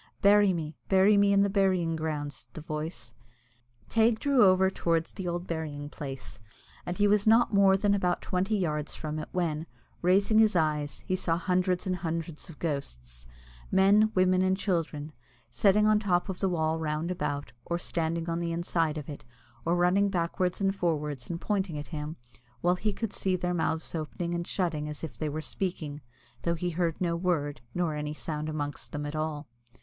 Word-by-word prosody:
"Bury 205 0 +6
me, 160 -3 -4
bury 195 +2 +5
me 200 0 +4
in 200 0 +5
the - - +3
burying 190 -4 +2
ground," 150 -2 -3
said - - -10
the 155 - -6
voice. 155 -5 -5 0.7
Teig 225 0 +3
drew 275 -1 +4
over 190 0 +5
towards 165 -3 0
the 190 - -5
old 175 +1 -2
burying 150 -4 -4
place, 135 -3 -7 0.5
and 175 - -3
he 205 0 +4
was 205 +1 +3
not 225 +1 +5
more 195 -1 +5
than 200 +1 +2
about 180 -3 +1
twenty 190 +4 0
yards 150 -5 -2
from 155 0 -4
it, - - -6
when, 165 -3 -1 0.3
raising 200 +5 +4
his 215 -3 +5
eyes, 150 -3 0
he 185 - 0
saw 170 -3 0
hundreds 180 +1 0
and 185 -1 -1
hundreds 165 0 -4
of 160 - -11
ghosts - - -5 0.4
men, 205 +3 +5
women, 185 0 +4
and 185 0 +2
children 160 -6 -2 0.4
sitting 200 - +4
on 215 0 +5
the - - -9
top 180 0 +1
of 185 - -4
the 195 - +1
wall 160 -2 0
round 155 +2 -2
about, 145 -9 -3
or 170 - -2
standing 165 -1 -2
on 165 0 -1
the 170 -1 -2
inside 165 -2 0
of 150 - -6
it, 145 - -8 0.4
or 170 +1 +2
running 180 +3 +3
backwards 180 0 -1
and 195 0 +1
forwards, 150 -7 -2
and 170 -1 -3
pointing 190 -5 -1
at 145 - -6
him, 150 -1 -5 0.5
while 175 +1 +3
he 210 +3 -1
could 220 +1 -4
see 190 -1 0
their 180 0 -1
mouths 160 -1 -1
opening 170 +2 -3
and 170 0 -3
shutting 160 -5 -1
as 150 - -7
if 160 - -5
they 155 - -2
were 155 +2 -3
speaking, 155 -5 -4 0.4
though 170 0 0
he 175 +1 -2
heard 170 -1 -1
no 170 -2 0
word, 165 -6 -1
nor 175 -3 0
any 150 0 -4
sound 155 0 -4
amongst 145 -2 -4
them 145 0 -3
at 145 +1 -4
all. 155 -1 -3
170 Hz, 195 wpm, -29 LUFS, 155-190 Hz, 0.7 s, Bury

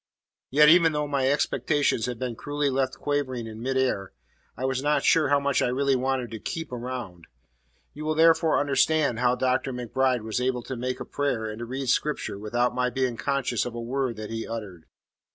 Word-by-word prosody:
Yet 150 +3 +6
even 165 0 +6
though 150 0 -1
my 135 -2 +1
expectations 145 -3 +1
had 125 -1 -4
been 125 -1 -4
cruelly 145 +2 -1
left 130 0 0
quivering 135 -5 -2
in 110 0 -8
mid 130 +2 -1
air, 110 -8 0 0.4
I 130 - -2
was 130 0 0
not 150 +1 +1
sure 155 -4 +4
how 145 0 +4
much 140 -1 +1
I - - +2
really 135 +2 +1
wanted 130 -2 -1
to 110 - -6
"keep 160 - -5
around." 120 -9 -6 0.7
You 155 +1 -7
will 155 0 0
therefore 165 0 +4
understand 140 -2 +2
how 125 0 +3
Dr. 130 +1 0
MacBride 125 0 0
was 110 +2 -2
able 125 -1 -1
to 130 - -5
make 125 +1 -3
a - - -5
prayer 140 -6 -1
and 110 +1 -6
to 120 - -4
read 130 +3 -4
Scripture 145 -8 -1
without 120 +4 0
my 125 0 0
being 130 -1 -1
conscious 125 0 -1
of 120 -1 -5
a - - -4
word 125 +1 -2
that 110 0 -7
he 115 0 -3
had - - -7
uttered. 105 -8 -7
130 Hz, 205 wpm, -26 LUFS, 120-140 Hz, 0.7 s, Yet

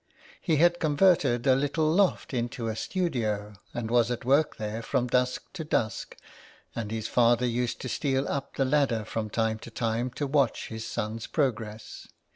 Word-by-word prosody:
He 160 - +1
had 175 +3 +4
converted 145 -6 +3
a 135 - +6
little 145 +3 +1
loft 190 -4 +2
into 120 -1 -2
a 110 - -2
studio, 110 - -2 0.2
and 115 -1 -4
was 120 -1 +4
at 120 -1 -3
work 140 +4 +3
there 110 +1 -4
from 120 +1 0
dusk 125 0 +1
to 175 -4 -5
dusk, 115 -8 -2 0.6
and 110 -3 -3
his 110 0 -3
father 120 0 +3
used 120 0 -1
to - - -4
steal 135 +1 0
up 140 -1 -3
the 135 - +1
ladder 130 -6 +1
from 110 0 -3
time 110 0 0
to 120 - -10
time 115 +2 -1
to 145 - -2
watch 140 -4 +1
his 110 0 -6
son's 110 +1 -4
progress. 110 -7 -3
120 Hz, 175 wpm, -28 LUFS, 110-140 Hz, 0.6 s, a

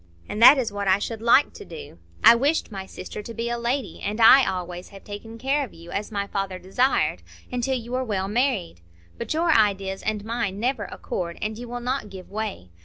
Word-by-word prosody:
And 215 - -4
that 265 +5 +10
is 240 -5 -1
what 200 -1 -3
I 190 0 +5
should 220 +2 -5
like 235 +5 +4
to - - -10
do. 155 - -11 0.2
I - - +10
wished 280 +3 +1
my 190 -2 -6
sister 190 - -8
to 230 +3 -8
be 235 +1 -2
a 240 - -1
lady, 235 - -2
and 210 +3 -3
I 250 +4 +8
always 180 -1 -5
have 195 -1 -13
taken 215 +2 -9
care 275 +4 0
of 255 - -9
you, 170 +1 -12
as 210 +2 -3
my 200 -1 -2
father 195 -2 -3
desired, 195 +9 +1 0.3
until 250 +2 -1
you 235 0 -8
were 255 +1 0
well 195 -5 -2
married. 220 - 0 0.4
But - - -3
your 335 +1 +2
ideas 195 -5 +2
and 210 -1 -2
mine 225 -4 -2
never 240 -2 -1
accord, 170 -2 -5
and 215 +1 -3
you 240 +2 -8
will 245 0 -5
not 250 -3 -2
give 190 -1 -11
way. 205 - -5
215 Hz, 220 wpm, -24 LUFS, 195-245 Hz, 0.4 s, that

